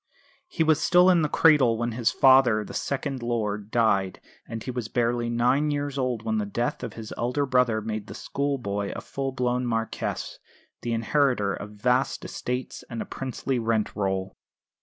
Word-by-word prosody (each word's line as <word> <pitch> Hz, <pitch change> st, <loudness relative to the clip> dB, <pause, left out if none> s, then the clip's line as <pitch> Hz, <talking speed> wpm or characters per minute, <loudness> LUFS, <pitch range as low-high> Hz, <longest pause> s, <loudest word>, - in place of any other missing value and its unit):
He 165 Hz, -, 0 dB
was 155 Hz, -1 st, +3 dB
still 180 Hz, +1 st, +5 dB
in 175 Hz, -2 st, +4 dB
the 150 Hz, -, +1 dB
cradle 140 Hz, -9 st, +4 dB
when 120 Hz, +1 st, -1 dB
his 115 Hz, +1 st, +1 dB
father, 130 Hz, -6 st, +5 dB
the -, -, -9 dB
second 140 Hz, -1 st, -3 dB
lord, 105 Hz, -3 st, -2 dB
died; 100 Hz, -5 st, +1 dB, 0.3 s
and 115 Hz, -1 st, -6 dB
he 130 Hz, -, -4 dB
was 125 Hz, -3 st, -4 dB
barely 120 Hz, 0 st, 0 dB
nine 125 Hz, +5 st, +2 dB
years 145 Hz, -1 st, -2 dB
old 125 Hz, -4 st, -1 dB
when 110 Hz, -1 st, 0 dB
the 105 Hz, -, -1 dB
death 120 Hz, +4 st, -2 dB
of -, -, -5 dB
his 110 Hz, -1 st, -8 dB
elder 125 Hz, +5 st, 0 dB
brother 125 Hz, -4 st, +2 dB
made 110 Hz, -1 st, -4 dB
the -, -, -8 dB
school 140 Hz, 0 st, -2 dB
boy 100 Hz, -4 st, -3 dB
a -, -, -5 dB
full 135 Hz, -1 st, -4 dB
blown 125 Hz, -1 st, 0 dB
Marquess, 115 Hz, -1 st, -3 dB, 0.4 s
the 120 Hz, -1 st, -2 dB
inheritor 115 Hz, -3 st, +1 dB
of 105 Hz, -, -6 dB
vast 125 Hz, +5 st, 0 dB
estates 125 Hz, +1 st, -4 dB
and 115 Hz, -2 st, -5 dB
a -, -, -3 dB
princely 130 Hz, 0 st, -3 dB
rent 115 Hz, -2 st, 0 dB
roll. 95 Hz, -2 st, -2 dB
120 Hz, 180 wpm, -26 LUFS, 110-135 Hz, 0.4 s, still